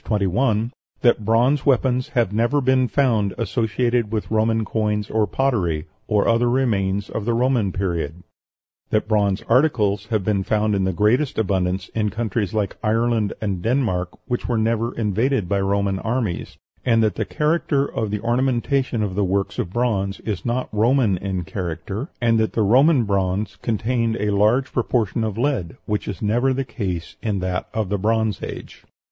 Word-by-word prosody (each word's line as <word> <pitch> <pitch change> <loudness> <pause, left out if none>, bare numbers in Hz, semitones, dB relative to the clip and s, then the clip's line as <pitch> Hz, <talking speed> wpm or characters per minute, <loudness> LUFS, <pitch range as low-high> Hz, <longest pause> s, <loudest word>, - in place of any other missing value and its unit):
21) 110 +3 0 0.3
that 120 -3 +4
bronze 120 +6 +3
weapons 130 -1 +2
have 115 -5 +2
never 120 +7 +2
been 130 -1 +2
found 115 -8 +1
associated 115 +1 0
with 110 -1 -3
Roman 110 0 +2
coins 105 -2 -1
or 110 -1 +2
pottery, 95 - 0 0.2
or 105 -1 +2
other 115 +1 +3
remains 100 -6 0
of 110 - -4
the 120 0 +1
Roman 120 -5 +1
Period; 85 -3 -3 0.7
that 110 - 0
bronze 100 -2 +1
articles 110 -6 +2
have 110 -4 0
been 100 0 +1
found 105 +2 +1
in 95 -1 +1
the 95 - +1
greatest 115 - +1
abundance 95 -3 0
in 105 -2 -1
countries 110 -2 -2
like 105 -2 -2
Ireland 115 -1 +1
and 100 -5 -2
Denmark, 110 -7 0
which 120 - -2
were 120 - +1
never 115 +1 0
invaded 110 0 0
by 100 +1 0
Roman 100 0 0
armies; 110 -5 -2 0.3
and 115 -3 +3
that 110 - +2
the - - -2
character 150 -2 +1
of 110 -6 -3
the 105 0 -3
ornamentation 125 0 0
of 100 -3 -2
the 100 +2 0
works 95 +1 -1
of 85 - -2
bronze 100 -4 -1
is 100 -7 -4
not 120 +2 -1
Roman 115 -1 +3
in 95 -2 -3
character, 90 - -5
and 115 -2 +3
that 110 - 0
the 110 - +1
Roman 130 +6 +5
bronze 100 0 -1
contained 115 0 0
a 105 0 0
large 110 +6 +2
proportion 115 -3 0
of 110 -2 -3
lead, 115 - -1
which 105 -1 -2
is 105 - -5
never 120 +5 +2
the 135 0 -2
case 95 -9 -4
in 105 -3 -1
that 90 0 -2
of 110 -4 -2
the 100 0 -1
Bronze 110 0 0
Age. - - -8
110 Hz, 170 wpm, -22 LUFS, 100-120 Hz, 0.7 s, Roman